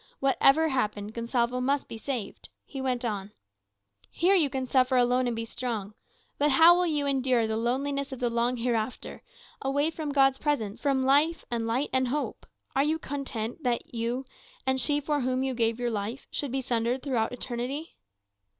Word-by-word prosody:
Whatever 275 +3 +4
happened, 210 -5 -1
Gonsalvo 235 +1 0
must 275 +2 0
be 225 - -8
saved. 250 -4 -5 0.2
He 270 - -6
went 255 -2 -1
on, 205 -2 -3 0.8
"Here 365 +3 +3
you 330 -7 +4
can 260 0 -2
suffer 255 0 +3
alone 250 +1 +3
and 240 - -1
be 230 0 -3
strong. 225 -4 -4 0.5
But 295 +1 +4
how 325 +5 +7
will 355 0 +2
you 295 -3 0
endure 260 -4 +2
the 220 0 -1
loneliness 275 +5 -1
of 265 - -6
the 245 - +1
long 235 +2 +1
hereafter, 230 -1 -2 0.4
away 285 +3 +1
from 310 -2 -4
God's 270 -1 +4
presence, 230 -9 -1
from 275 -2 +1
light 295 +5 +3
and 230 -1 -1
life 250 +6 0
and 260 -1 +2
hope? 290 +4 -3 0.3
Are 270 - +4
you 310 +2 +1
content 270 -4 -5
that 245 -3 -2
you, 235 +3 -2 0.4
and 265 0 +1
she 290 +3 +1
for 295 0 -1
whom 255 +1 0
you 265 -1 -1
give 230 -1 0
your 240 -1 -1
life, 220 +5 -4
should 285 -4 -2
be 265 +1 -1
sundered 245 0 -1
throughout 240 -6 0
eternity?" 250 +5 -4
255 Hz, 180 wpm, -28 LUFS, 235-280 Hz, 0.8 s, how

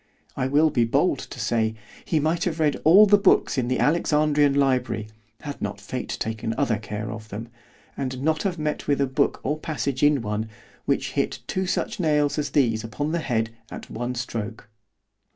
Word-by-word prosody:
——I 130 - 0
will 150 +3 +3
be 120 - +2
bold 115 - +2
to - - -9
say, 110 -1 0 0.3
he 160 - +1
might 160 +3 0
have 165 -3 -2
read 150 -2 +1
all 190 +7 +8
the 205 0 +5
books 200 - +3
in 125 -3 0
the 130 - 0
Alexandrian 150 -2 +3
Library, 130 -6 +1 0.3
had 145 -1 -7
not 100 -1 -3
fate 120 +6 -5
taken 110 0 -3
other 110 -2 +1
care 105 0 -5
of 110 -1 -8
them, 115 +4 -6 0.5
and 130 -2 -3
not 155 0 +1
have 185 -3 -1
met 150 -1 -3
with 145 -1 +2
a 140 - +3
book 130 0 0
or 150 +3 -1
passage 140 -4 -3
in 145 -4 +4
one, 105 +1 -2 0.4
which - - 0
hit - - -1
two 190 0 -2
such - - -2
nails 150 -3 +2
as 145 0 -1
these 120 -5 +2
upon 145 +7 -3
the 170 - 0
head 115 -7 -1 0.2
at - - -9
one 120 +2 -3
stroke. 115 -3 -5
135 Hz, 190 wpm, -24 LUFS, 115-155 Hz, 0.5 s, all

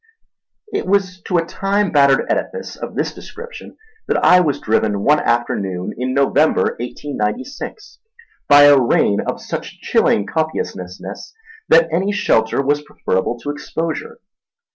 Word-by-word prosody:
It - - -2
was 190 -2 0
to 180 - +1
a 165 - +1
time 200 +2 -1
battered 140 -2 +4
edifice 470 - -3
of - - -7
this - - -1
description 470 +2 -11 0.3
that - - +1
I 180 - +7
was 155 -6 0
driven 105 -2 0
one 150 +1 +4
afternoon 100 -6 -1
in 130 +1 -3
November, 140 +3 +2
1896, 140 - -5 0.5
by 145 0 +8
a 145 -2 +7
rain 105 -4 +2
of - - -4
such - - -6
chilling 100 - +2
copiousness 95 - -3 0.7
that 165 0 +6
any 190 +4 +1
shelter 135 - +1
was 145 +2 +1
preferable 120 -5 -2
to 145 - -3
exposure. 160 +2 -5
145 Hz, 135 wpm, -18 LUFS, 120-180 Hz, 0.7 s, by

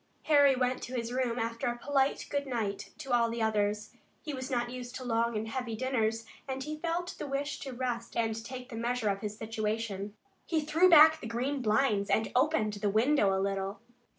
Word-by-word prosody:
Harry 285 -3 +5
went 255 0 0
to 255 - -6
his 235 0 -3
room, 250 -2 0
after 230 0 -2
a 240 0 -1
polite 275 +1 +1
good 285 -1 -1
night 220 -6 -3
to 270 -4 -7
all 235 -1 +4
the 230 +1 -4
others. 210 -1 0 0.3
He 300 - -4
was 260 0 -5
not 240 -2 -1
used 250 0 -7
to 260 - -5
long 230 -1 0
and 220 +1 -3
heavy 235 -1 -3
dinners, 225 -2 0 0.2
and 265 0 -3
he 305 +1 -5
felt 345 +2 -2
the - - -4
wish 280 +2 -2
to 270 - -6
rest 245 -2 -3
and 225 -1 0
take 250 +1 -8
the 235 - -7
measure 235 -1 0
of 195 0 -1
his 210 0 -5
situation. 215 -2 -3 0.3
He 325 - +1
threw 320 +5 +4
back 315 -1 +8
the - - -5
green 260 +5 -2
blinds 215 -2 +2
and 220 - +1
opened 250 -6 +2
the 205 0 -1
window 220 0 +3
a 190 - +1
little. 195 +1 -2
240 Hz, 205 wpm, -30 LUFS, 220-270 Hz, 0.3 s, back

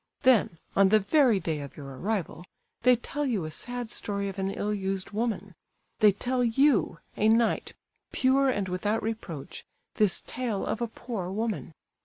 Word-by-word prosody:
Then, 235 -9 +4 0.2
on 195 -1 +5
the 215 - +6
very 240 0 +4
day 160 -3 -2
of 140 -1 -9
your 145 - -8
arrival, 190 +1 -3 0.4
they 250 +1 +6
tell 285 +5 -4
you 225 - 0
a 155 - -5
sad 245 +6 -4
story 200 -1 -2
of 195 0 -7
an 190 0 0
ill 205 +1 -2
used 195 -1 -3
woman; 205 -3 -2 0.5
they 210 -1 +7
tell 250 +5 -1
you, 240 - +3 0.2
a 215 - +3
knight, 230 0 +2 0.4
pure 270 +1 +3
and 205 -6 0
without 205 +4 -1
reproach, 210 -10 -5 0.3
this 210 -4 +2
tale 235 -5 -2
of 230 - -2
a 235 - 0
poor 220 -5 -5
woman! 210 -5 -3
210 Hz, 170 wpm, -28 LUFS, 190-240 Hz, 0.5 s, they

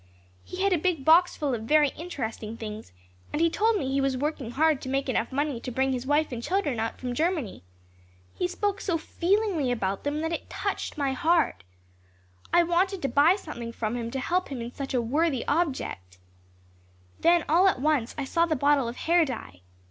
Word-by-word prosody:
He 365 +1 -5
had 395 -1 +3
a 345 - +2
big 320 -5 -1
box 340 +3 +5
full 285 -3 -1
of 230 - -2
very 300 +3 +4
interesting 230 -9 -6
things 215 - -7 0.4
and 295 - -2
he 335 0 +3
told 440 +3 +2
me 265 -7 -2
he 275 0 +1
was 270 -1 0
working 285 -3 -2
hard 305 +3 +2
to 260 - -6
make 270 +1 -1
enough 240 -2 -1
money 285 -2 -1
to 250 - -6
bring 265 +2 +1
his 255 0 -4
wife 295 +1 +2
and 240 -2 -4
children 300 - -1
out 225 +1 -3
from 250 -1 -3
Germany. 315 - -1 0.7
He 360 - -1
spoke 400 +2 -2
so 345 -4 0
feelingly 345 - 0
about 195 -5 -2
them 290 +1 -1
that 325 +1 -2
it - - -5
touched - - -3
my 275 -2 0
heart. 320 - +1 0.9
I 345 - +5
wanted 360 +2 0
to 275 - +1
buy 305 +6 +5
something 240 - -7
from 225 0 -3
him 235 -1 -3
to 265 - -3
help 360 +8 0
him 270 -3 -5
in 235 +1 -6
such 275 -2 -4
a 245 - +2
worthy 285 +2 0
object. 265 - -2 1.0
Then 340 0 +4
all 350 +5 +5
at 370 - +2
once 280 -4 0
I 285 - -2
saw 335 +5 +1
the 315 - +1
bottle 285 -2 +2
of 235 - -5
hair 340 +4 +3
dye. 220 - -6
290 Hz, 205 wpm, -27 LUFS, 245-335 Hz, 1.0 s, box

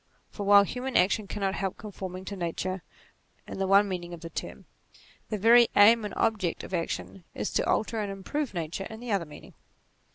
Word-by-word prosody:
For 200 -2 -5
while 200 0 +8
human 250 +5 -2
action 200 +3 +2
cannot 195 -2 -2
help 195 -1 -3
conforming 190 -3 -7
to 200 - -5
Nature 185 +1 -3 0.7
in - - -7
the 195 - 0
one 200 +1 +5
meaning 175 -2 -5
of 165 - -15
the 165 - -8
term, - - -6 0.6
the 215 - -2
very 230 +3 +6
aim 225 +2 +7
and 210 - -5
ob 225 -1 +1
ject 175 -4 -2
of - - -9
action 175 +2 -3
is - - -3
to - - +1
alter 220 +1 0
and 205 -2 -2
improve 215 +6 -4
Nature 170 +3 -4
in 220 - -9
the 240 -1 -6
other 195 -4 +1
meaning. 150 - -13
195 Hz, 200 wpm, -28 LUFS, 185-215 Hz, 0.7 s, while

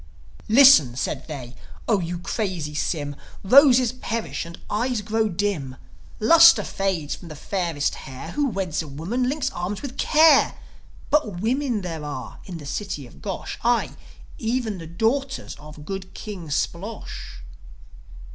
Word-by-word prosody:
"Listen," 225 - +7
said 135 +1 -3
they, 130 -6 -7 0.3
"O 215 -4 +3
you 175 0 -3
crazy 180 -4 -3
Sym. 145 -1 -2 0.3
Roses 255 +2 +6
perish, 230 -6 -4
and 170 - -11
eyes 235 +2 -1
grow 220 +1 0
dim. 175 -9 -2 0.4
Lustre 330 -2 +7
fades 190 -8 -2
from 175 - -9
the 155 - -8
fairest 165 -3 -1
hair. 135 +5 -8
Who 290 -1 0
weds 190 -7 -2
a 160 - -8
woman 190 - -2
links 295 +1 -1
arms 180 +6 -4
with 275 -2 -7
care. 310 -2 +5 0.6
But 215 - +1
women 245 +1 0
there 165 -4 -5
are 145 -4 -7
in 180 -3 -7
the 150 - -10
city 150 -2 -4
of 120 - -16
Gosh 195 -3 -5
Ay, 240 0 +2 0.5
even 225 -4 -1
the 165 - -8
daughters 250 - -1
of 150 0 -12
good 190 +1 -6
King 195 -6 -7
Splosh. 180 - -4
195 Hz, 145 wpm, -24 LUFS, 160-240 Hz, 0.6 s, Listen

